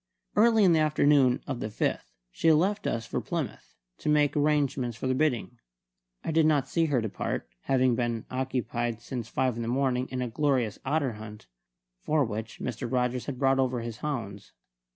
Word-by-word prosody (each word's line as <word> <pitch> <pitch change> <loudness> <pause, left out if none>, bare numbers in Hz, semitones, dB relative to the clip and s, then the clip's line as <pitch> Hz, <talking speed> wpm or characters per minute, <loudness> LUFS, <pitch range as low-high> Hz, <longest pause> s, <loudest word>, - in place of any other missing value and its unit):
Early 225 0 +5
in 180 -3 +6
the 160 - +4
afternoon 145 -4 +3
of 130 -4 -4
the - - -3
5th, 105 - -1 0.3
she 165 - +3
left 190 +7 +2
us 115 0 -2
for - - -3
Plymouth, - - -5 0.2
to - - -2
make 150 -1 +3
arrangements 140 -5 +1
for - - -5
the 130 - +2
bidding. 130 -4 0 0.6
I - - -2
did 160 0 +4
not 145 -4 +2
see 165 -1 +1
her 140 -6 +1
depart, 110 - -3 0.2
having 130 -2 +3
been 120 -1 -1
occupied 120 -3 -2
since 120 -1 -5
five 130 0 0
in - - -3
the 115 - -3
morning 130 0 0
in 130 -1 -2
a - - -2
glorious 125 -4 0
otter 140 -3 0
hunt, 105 - -10 0.5
for 150 - +1
which 110 0 -5
Mr. 120 -1 -4
Rogers 125 -1 0
had 140 -3 -4
brought 135 0 +3
over 130 -2 +1
his 115 -1 -6
hounds. 115 -9 -5
130 Hz, 185 wpm, -28 LUFS, 120-150 Hz, 0.6 s, in